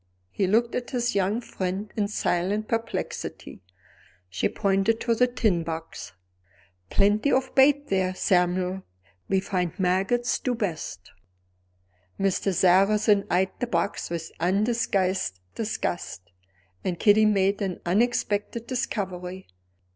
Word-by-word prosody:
He 195 - 0
looked 230 +4 +2
at 245 - -3
his 245 -1 -1
young 200 +4 +1
friend 190 -1 -4
in 210 -2 0
silent 205 +1 -1
perplexity; 230 - -4 0.7
she 90 - 0
pointed 200 +2 +1
to 235 - +1
the 250 +2 +3
tin 215 -8 +1
box. 165 -6 -6 0.8
"Plenty 210 +7 +2
of 260 0 +1
bait 285 +2 +4
there, 185 -1 0
Samuel; 180 +1 +1 0.5
we 195 - +3
find 180 -3 -2
maggots 195 +6 +1
do 250 -2 -1
best." 160 - -4 1.1
Mr. 195 0 +1
Sarrazin 195 +3 +4
eyed 185 +1 +2
the 245 - -1
box 170 -6 -1
with 165 -1 -5
undisguised 190 - 0
disgust; 175 - -4 0.5
and 180 -2 -2
Kitty 215 +1 +5
made 200 0 +2
an 190 -3 -2
unexpected 210 +2 0
discovery. 190 -7 -4
195 Hz, 115 wpm, -26 LUFS, 180-225 Hz, 1.1 s, Kitty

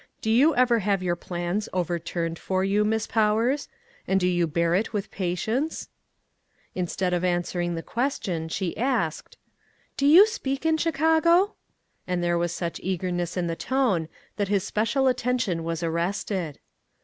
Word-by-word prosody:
Do 220 - -1
you 280 +8 +5
ever 240 -2 +4
have 195 -2 0
your 175 -1 0
plans 175 +4 -3
overturned 170 -1 -2
for 190 0 -1
you, 200 +2 +2
Miss 220 +1 0
Powers, 225 +6 +1 0.4
and 190 0 +2
do 180 - +1
you 175 -2 +1
bear 170 +2 +1
it 205 +5 0
with 205 -1 -3
pa 180 -2 -2
tience? 250 - -2 0.4
" - - -48 0.3
Instead 180 0 -1
of 175 0 0
answering 175 -1 -1
the 165 - -5
question, 210 - -2
she 180 +1 -2
asked: 230 - -1 0.3
" - - -38
Do 280 - +2
you 345 +8 +9
speak 280 - -4
in 320 0 +3
Chicago? 330 +5 +3 0.3
" - - -46
and 180 -1 -1
there 175 0 +1
was 175 0 0
such 170 -1 -4
eagerness 175 -1 -2
in 180 - 0
the 165 -1 -2
tone, 210 -10 0 0.3
that 205 -2 0
his 200 -1 +1
special 230 +6 0
attention 250 -8 0
was 165 0 -3
arrested. 170 -1 -2
190 Hz, 170 wpm, -25 LUFS, 175-245 Hz, 0.4 s, you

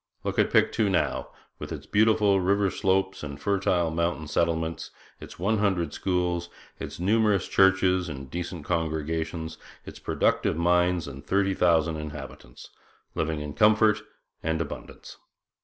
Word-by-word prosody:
Look - - -2
at - - +3
Pictou 105 -3 +3
now, 95 - 0 0.3
with - - -7
its - - -6
beautiful 105 -2 +3
river 100 +1 +2
slopes 95 -1 0
and 70 -2 -7
fertile 95 -4 +1
mountain 85 -1 -1
settlements, 80 +1 -1 0.3
its - - -11
one 100 +5 +1
hundred 90 -7 0
schools, 90 -2 -1 0.3
its - - -7
numerous 105 0 +2
churches 95 -2 +3
and 70 -3 -7
decent 85 +1 -5
congregations, 80 0 -2 0.3
its - - -10
productive - - 0
mines 90 -1 +2
and 70 0 -9
thirty 95 +5 +1
thousand 85 -3 +2
inhabitants, 75 -5 -9 0.4
living 80 -1 -2
in 75 -1 -5
comfort 110 +1 +4 0.4
and 80 0 -1
abundance. 80 -3 -7
85 Hz, 135 wpm, -26 LUFS, 80-95 Hz, 0.4 s, comfort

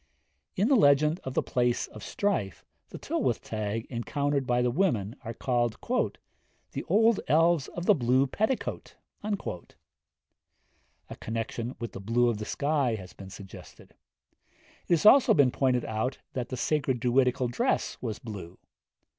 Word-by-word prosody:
In 200 +4 +2
the 275 - +4
legend 150 - +4
of 130 - -6
the - - +2
Place 120 -1 0
of 110 - -12
Strife, 150 - -2 0.2
the - - -8
Tylwyth - - -1
Teg 110 +1 -3
encountered 135 +4 -1
by 125 0 +2
the 125 - +1
women 120 - 0
are 115 -1 -6
called 120 -3 0 0.9
'the - - -4
old 225 0 +3
elves 165 0 +3
of 175 - -6
the 210 - +6
blue 130 -3 +2
petticoat.' 220 - -2 0.3
A 200 - -10
connection 115 +2 -4
with 115 - -5
the - - -8
blue 120 +4 +2
of 110 -3 -2
the 105 - -4
sky 140 -4 0
has 95 -4 -9
here - - -24
been 95 -1 -9
suggested. 95 0 -12 0.9
It - - +2
has 170 - +1
also 260 +5 +7
been 140 -5 +4
pointed 125 -2 +1
out 110 +4 -2 0.2
that 125 -1 -3
the 130 - -4
sacred 135 -2 0
Druidical 125 +1 +2
dress 120 - -1
was 110 - -3
blue. 95 -6 -9
125 Hz, 155 wpm, -28 LUFS, 115-150 Hz, 0.9 s, also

